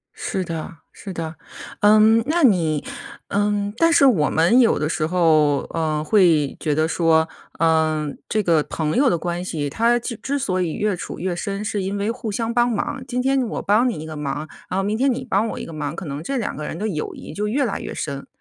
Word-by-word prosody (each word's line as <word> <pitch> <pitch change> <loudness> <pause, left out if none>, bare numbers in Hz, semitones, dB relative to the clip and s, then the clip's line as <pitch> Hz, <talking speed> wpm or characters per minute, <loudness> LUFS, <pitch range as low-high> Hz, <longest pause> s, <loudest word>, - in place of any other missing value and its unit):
是 190 - -3
的， 165 0 -6
是 195 - -9
的。 165 -1 -5 0.5
嗯， 215 +2 +6
那 330 +1 +1
你 165 - +3 0.4
嗯， 205 0 0
但 330 +4 +4
是 280 - +5
我 185 - +4
们 170 +11 +4
有 235 - +4
的 150 - -1
时 155 -1 -1
候， 155 -5 +3
呃， 155 -2 -1
会 160 -5 +3
觉 150 -2 0
得 155 +1 +2
说， 160 -1 +2 0.3
呃， 160 -2 +2 0.2
这 215 -1 +1
个 165 -3 +3
朋 155 0 -2
友 265 0 +4
的 170 - +1
关 175 +2 -3
系 150 -5 -3
它 235 +5 +3
记 235 0 -4
之 280 +3 -1
所 185 -9 -1
以 165 -3 -1
越 210 -2 0
处 - - -7
越 180 0 -2
深， 200 +2 -4
是 205 -1 -2
因 195 +2 -2
为 205 +3 -1
互 230 -3 -5
相 230 +3 -2
帮 240 +1 +3
忙 210 - -1
儿。 - - -5
今 250 +1 -1
天 270 0 +2
我 - - -4
帮 220 +5 +3
你 230 - -3
一 155 - -7
个 155 - -7
忙， 150 +1 -4 0.2
然 185 - -2
后 - - 0
明 210 +2 -1
天 270 +1 +2
你 255 +1 -3
帮 215 0 +1
我 - - -5
一 - - -6
个 165 - -9
忙， 150 0 -4
可 185 - -6
能 145 +1 -5
这 270 +10 -3
两 220 - -3
个 150 - -5
人 - - -5
的 215 +4 -2
友 155 -7 -4
谊 - - -9
就 210 +4 -2
越 270 +6 +1
来 225 - -2
越 - - -6
深。 140 -2 -5
185 Hz, 255 characters per minute, -22 LUFS, 160-225 Hz, 0.5 s, 嗯